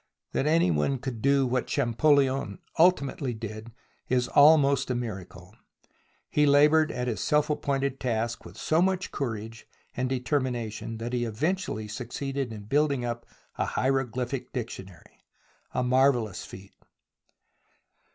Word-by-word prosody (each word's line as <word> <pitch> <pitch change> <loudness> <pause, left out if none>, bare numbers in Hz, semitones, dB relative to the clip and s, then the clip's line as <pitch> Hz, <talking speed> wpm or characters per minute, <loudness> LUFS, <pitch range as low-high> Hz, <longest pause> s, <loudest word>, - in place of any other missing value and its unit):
That 140 - 0
any 155 - +3
one 80 - +1
could 125 -3 -6
do 140 +1 +3
what 125 0 -1
Champollion 135 -3 +2 0.2
ultimately 140 -7 +2
did 110 +1 -7 0.4
is 125 -1 +2
almost 140 -2 +5
a 125 - 0
miracle. 95 -4 -7 0.7
He 150 0 +2
laboured 150 +2 +5
at 125 0 -3
his 110 -6 -2
self 150 0 +2
appointed 140 -2 -1
task 115 -2 -2
with - - -12
so 160 +2 +1
much 185 0 0
courage 115 -4 -5 0.3
and 125 +1 -1
determination 125 -4 -2
that 120 +2 -5
he 120 -1 0
eventually 120 - -2
succeeded 130 +4 -4
in 105 -2 -8
building 140 +2 +1
up 120 -1 -4 0.3
a - - +2
hieroglyphic 130 -1 -1
dictionary 95 - -8 0.3
— - - -37
a - - -1
marvellous 125 -6 +2
feat. 95 +1 -12
125 Hz, 130 wpm, -27 LUFS, 115-140 Hz, 0.7 s, almost